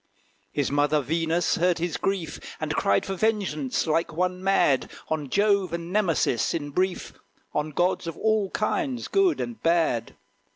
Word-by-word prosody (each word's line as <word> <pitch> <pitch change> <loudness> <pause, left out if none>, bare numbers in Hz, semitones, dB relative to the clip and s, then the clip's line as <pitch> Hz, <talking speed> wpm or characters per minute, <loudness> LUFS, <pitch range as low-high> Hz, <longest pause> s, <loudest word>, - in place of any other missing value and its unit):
His 145 -2 -1
mother, 145 +1 +2
Venus, 165 +4 0
heard 175 +1 +2
his 170 -1 -2
grief, 180 -6 -2 0.2
And 155 -1 -2
cried 100 -9 +2
for 195 - -3
vengeance, 190 - 0
like 165 +1 +1
one 180 +3 -1
mad, 190 -8 +3 0.2
On 150 -3 -2
Jove 200 -2 +2
and 170 +1 -4
Nemesis, 170 - +1
in 145 -3 -4
brief, 185 +4 -1 0.4
On 150 +1 -1
gods 175 +3 0
of 165 - -5
all 215 -3 +1
kinds, 255 - -1
good 390 -4 +2
and 235 -2 -5
bad. 165 -9 +1
170 Hz, 155 wpm, -26 LUFS, 150-195 Hz, 0.4 s, mad